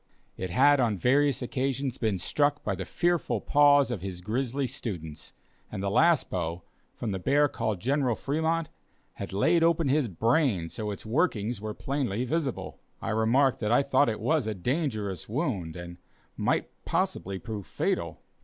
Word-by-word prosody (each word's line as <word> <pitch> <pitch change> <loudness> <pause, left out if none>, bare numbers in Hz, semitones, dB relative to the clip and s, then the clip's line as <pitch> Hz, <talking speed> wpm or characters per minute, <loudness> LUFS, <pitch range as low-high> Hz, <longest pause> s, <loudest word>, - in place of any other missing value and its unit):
It 95 - -4
had 140 +9 +5
on 115 -5 +2
various 135 - +2
occasions 135 +1 -2
been 110 -4 0
struck 145 +10 0
by - - -1
the - - -4
fearful 175 -1 0
paws 145 -2 +4
of 110 -7 -3
his 90 -2 -6
grizzly 130 +6 -1
students; 80 -11 -6 0.4
and 100 -2 -4
the 100 - 0
last 165 +4 +4
blow, 85 -1 -3 0.3
from 115 - -3
the 95 - -2
bear 145 +10 +3
called 110 -7 -2
"General 130 +1 +1
Fremont," 160 +4 -1 0.5
had 100 - -6
laid 165 - +3
open 165 -3 +3
his 140 -1 +2
brain 110 - +1
so 110 - -5
that 105 - -2
its 100 - -10
workings 115 - 0
were 110 0 -5
plainly 130 -5 -2
visible. 140 -1 -3 0.2
I - - -4
remarked 115 +5 +3
that 105 -1 -1
I 120 +3 +4
thought 140 -1 +3
it 110 - -3
was 135 +2 +1
a 110 - -2
dangerous 105 - -2
wound 110 - -2
and 85 0 -8 0.4
might - - 0
possibly 95 0 -1
prove 105 -2 -6
fatal. - - -2
120 Hz, 170 wpm, -28 LUFS, 100-145 Hz, 0.5 s, had